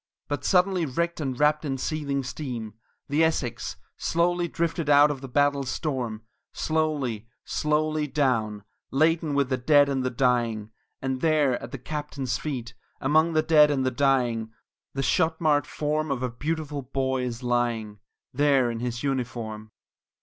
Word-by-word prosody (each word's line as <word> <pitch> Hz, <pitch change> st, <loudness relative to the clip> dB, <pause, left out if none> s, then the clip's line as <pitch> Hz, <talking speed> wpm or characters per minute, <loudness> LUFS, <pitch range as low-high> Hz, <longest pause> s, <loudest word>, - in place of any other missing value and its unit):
But 145 Hz, -, -3 dB
suddenly 185 Hz, -1 st, +3 dB
wrecked 170 Hz, +6 st, -1 dB
and 130 Hz, -4 st, -3 dB
wrapt 150 Hz, +1 st, +3 dB
in 135 Hz, -3 st, -2 dB
seething 140 Hz, -1 st, -2 dB
steam, 125 Hz, -4 st, -5 dB, 0.3 s
the 150 Hz, +3 st, +2 dB
Essex 150 Hz, -7 st, -1 dB, 0.2 s
Slowly 175 Hz, +1 st, +1 dB
drifted 165 Hz, -2 st, -2 dB
out 145 Hz, +1 st, +7 dB
of 135 Hz, -3 st, -5 dB
the 135 Hz, -, -6 dB
battle's 140 Hz, 0 st, +1 dB
storm; 125 Hz, -8 st, -3 dB, 0.3 s
Slowly, 145 Hz, -9 st, -1 dB, 0.2 s
slowly 155 Hz, 0 st, 0 dB
down 115 Hz, -8 st, 0 dB, 0.3 s
laden 155 Hz, +1 st, +2 dB
with 140 Hz, -2 st, +2 dB
the 130 Hz, -, +1 dB
dead 145 Hz, +2 st, +5 dB
and 135 Hz, -2 st, 0 dB
the 130 Hz, -, 0 dB
dying; 120 Hz, -4 st, 0 dB, 0.3 s
And 130 Hz, -1 st, -2 dB
there, 150 Hz, -5 st, +2 dB
at -, -, -8 dB
the 135 Hz, -, -5 dB
captain's 140 Hz, -1 st, -4 dB
feet, 125 Hz, -6 st, -4 dB, 0.3 s
among 155 Hz, +4 st, +3 dB
the 155 Hz, 0 st, +3 dB
dead 150 Hz, -2 st, +6 dB
and 135 Hz, -3 st, 0 dB
the 130 Hz, -, +1 dB
dying, 120 Hz, -4 st, +1 dB, 0.4 s
The 135 Hz, -, -1 dB
shot 160 Hz, +4 st, +2 dB
marred 145 Hz, -3 st, +2 dB
form 155 Hz, +1 st, -1 dB
of 130 Hz, -2 st, -1 dB
a 125 Hz, -, -1 dB
beautiful 150 Hz, +2 st, -3 dB
boy 130 Hz, 0 st, -1 dB
is 125 Hz, 0 st, -4 dB
lying 120 Hz, -4 st, -1 dB, 0.3 s
There 135 Hz, -3 st, +3 dB
in 115 Hz, -, -4 dB
his 120 Hz, 0 st, -3 dB
uniform! 115 Hz, -5 st, -3 dB
140 Hz, 155 wpm, -26 LUFS, 125-155 Hz, 0.4 s, out